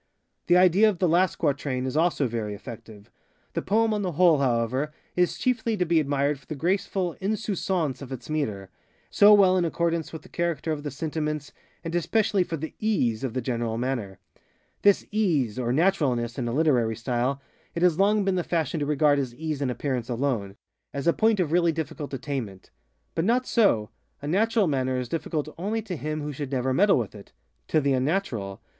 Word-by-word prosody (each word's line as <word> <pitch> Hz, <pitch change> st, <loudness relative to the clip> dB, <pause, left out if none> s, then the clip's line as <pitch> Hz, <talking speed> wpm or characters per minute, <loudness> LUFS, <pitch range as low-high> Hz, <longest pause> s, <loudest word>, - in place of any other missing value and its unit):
The 175 Hz, -, +5 dB
idea 185 Hz, +4 st, +5 dB
of 200 Hz, -, -2 dB
the 180 Hz, -, +2 dB
last 175 Hz, +3 st, +3 dB
quatrain 140 Hz, -4 st, -1 dB
is 130 Hz, -, -3 dB
also 160 Hz, -3 st, +2 dB
very 110 Hz, -3 st, -3 dB
effective. 105 Hz, 0 st, -11 dB, 0.4 s
The -, -, -1 dB
poem 220 Hz, +2 st, +2 dB
on 210 Hz, -, -1 dB
the 180 Hz, -3 st, -2 dB
whole, 165 Hz, -2 st, +5 dB
however, 130 Hz, +3 st, 0 dB, 0.2 s
is 180 Hz, -1 st, +1 dB
chiefly 230 Hz, -3 st, 0 dB
to 180 Hz, -, +1 dB
be 165 Hz, -1 st, +3 dB
admired 140 Hz, -1 st, 0 dB
for 135 Hz, -, -25 dB
the 155 Hz, -, -5 dB
graceful 180 Hz, +2 st, -1 dB
_insouciance 190 Hz, -, -1 dB
_of 135 Hz, -, -10 dB
its 125 Hz, -3 st, -7 dB
metre, 105 Hz, -11 st, -3 dB, 0.4 s
so 205 Hz, +1 st, +7 dB
well 190 Hz, -3 st, +6 dB
in 180 Hz, -, +2 dB
accordance 170 Hz, -1 st, -1 dB
with 160 Hz, -, -8 dB
the -, -, -14 dB
character 170 Hz, -2 st, -2 dB
of 150 Hz, -2 st, -2 dB
the 145 Hz, -, -4 dB
sentiments, 150 Hz, 0 st, -3 dB, 0.3 s
and 165 Hz, -1 st, -5 dB
especially 195 Hz, +3 st, +2 dB
for 165 Hz, -2 st, -4 dB
the 160 Hz, +2 st, -6 dB
_ease 130 Hz, -, +1 dB
_of 130 Hz, -3 st, -4 dB
the 130 Hz, -, -2 dB
general 115 Hz, -2 st, -2 dB
manner. 120 Hz, -6 st, -3 dB, 0.6 s
This 200 Hz, -1 st, +4 dB
ŌĆ£easeŌĆØ 150 Hz, -, +1 dB
or 120 Hz, -1 st, -1 dB
naturalness, 135 Hz, -7 st, +1 dB
in 120 Hz, -, -2 dB
a -, -, -1 dB
literary 125 Hz, -6 st, +2 dB
style, 125 Hz, +4 st, -1 dB, 0.4 s
it 170 Hz, -, -1 dB
has 180 Hz, -1 st, +3 dB
long 205 Hz, +1 st, +3 dB
been 195 Hz, -, +2 dB
the 180 Hz, -1 st, 0 dB
fashion 160 Hz, -2 st, -1 dB
to 145 Hz, -, -1 dB
regard 150 Hz, -1 st, +3 dB
as 125 Hz, -3 st, -3 dB
ease 155 Hz, 0 st, -4 dB
in 135 Hz, -, 0 dB
appearance 125 Hz, -1 st, -3 dB
aloneŌĆöas 120 Hz, +2 st, -4 dB
a 170 Hz, -, +4 dB
point 220 Hz, -2 st, +2 dB
of 165 Hz, -5 st, 0 dB
really 170 Hz, 0 st, +3 dB
difficult 155 Hz, -2 st, -5 dB
attainment. 130 Hz, -8 st, -5 dB, 0.4 s
But 165 Hz, -, -1 dB
not 245 Hz, +4 st, +2 dB
so:ŌĆöa 145 Hz, -, 0 dB
natural 220 Hz, +3 st, +2 dB
manner 130 Hz, -4 st, 0 dB
is 125 Hz, -2 st, -4 dB
difficult 155 Hz, -2 st, -2 dB
only 215 Hz, +5 st, -2 dB
to 190 Hz, -4 st, -5 dB
him 155 Hz, 0 st, -4 dB
who 150 Hz, 0 st, -4 dB
should 140 Hz, 0 st, -5 dB
never 130 Hz, 0 st, 0 dB
meddle 200 Hz, +8 st, +4 dB
with 115 Hz, -6 st, -2 dB
itŌĆöto 110 Hz, +8 st, -5 dB
the 140 Hz, -1 st, +2 dB
unnatural. 130 Hz, -, -1 dB
150 Hz, 190 wpm, -26 LUFS, 130-180 Hz, 0.6 s, so